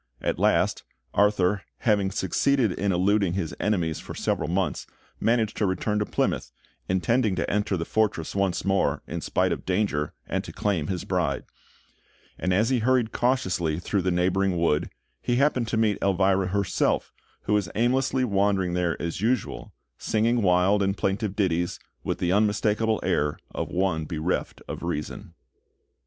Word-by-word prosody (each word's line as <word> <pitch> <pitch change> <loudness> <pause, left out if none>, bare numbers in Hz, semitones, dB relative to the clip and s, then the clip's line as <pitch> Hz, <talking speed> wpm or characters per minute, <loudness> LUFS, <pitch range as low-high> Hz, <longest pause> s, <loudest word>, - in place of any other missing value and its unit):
At - - -2
last, - - +2 0.3
Arthur, 100 -1 +3 0.2
having 105 -5 +2
succeeded 110 +5 +1
in 100 +2 -1
eluding 95 0 +2
his 90 -4 -2
enemies 85 -7 0
for - - -8
several - - -1
months, 95 +2 -1 0.3
managed 115 -2 +1
to 105 - +1
return 105 +3 0
to 105 - -1
Plymouth, - - -1 0.4
intending 105 +3 +2
to - - -1
enter 105 -2 0
the 80 - -3
fortress 105 -7 0
once 100 -2 0
more, 95 0 +1
in - - -5
spite - - +1
of - - -3
danger, 90 -6 -1
and - - -1
to - - -8
claim 90 -8 -1
his 90 -3 -3
bride; - - -1 1.0
and 90 - 0
as 105 +6 +3
he 130 -2 +2
hurried 120 -1 +2
cautiously 95 -11 0
through 95 +3 -1
the 90 - 0
neighbouring 90 +1 +1
wood, 80 -3 +1 0.3
he 120 - 0
happened 130 -3 +2
to 110 - -1
meet 110 -3 +2
Elvira 95 0 +2
herself, 100 0 0 0.3
who 105 - 0
was 105 -5 +1
aimlessly 130 +3 +2
wandering 100 -4 +1
there 90 -2 0
as 85 +2 -3
usual, 120 +1 -1 0.3
singing 115 +2 +1
wild 95 +2 +3
and 100 0 0
plaintive 100 +1 -1
ditties 90 -4 0 0.2
with - - -2
the 90 - 0
unmistakable 105 +2 +2
air 75 0 0 0.2
of - - -3
one 90 -4 0
bereft 80 +3 -3
of - - -6
reason. 80 -3 -5
100 Hz, 160 wpm, -26 LUFS, 90-110 Hz, 1.0 s, Arthur